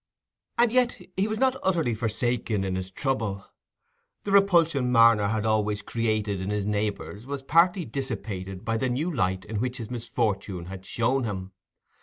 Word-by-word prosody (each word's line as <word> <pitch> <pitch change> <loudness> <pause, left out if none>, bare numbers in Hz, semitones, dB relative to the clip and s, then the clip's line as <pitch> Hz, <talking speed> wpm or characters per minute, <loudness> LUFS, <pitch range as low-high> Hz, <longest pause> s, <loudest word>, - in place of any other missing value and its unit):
And 235 -1 +4
yet 250 -1 +2 0.2
he 195 +2 +1
was 220 0 -2
not 265 +2 +2
utterly 165 -10 +1
forsaken 115 -1 -1
in 95 -1 -1
his 95 0 -4
trouble. 100 -4 -2 0.8
The 200 - -3
repulsion 170 -10 +4
Marner 115 -3 +6
had 110 0 -1
always 105 -1 +1
created 110 -4 -1
in 95 - -3
his 105 -1 -1
neighbours 105 +2 -3
was 140 -1 -4
partly 170 +4 +3
dissipated 100 -7 -5
by 115 0 0
the 130 +3 0
new 155 +8 -1
light 95 -7 0
in 110 0 -4
which 125 +1 -2
this 115 -2 -7
misfortune 105 -6 -2
had 95 +1 -9
shown 125 +4 +1
him. 95 -3 -4
115 Hz, 165 wpm, -26 LUFS, 100-135 Hz, 0.8 s, Marner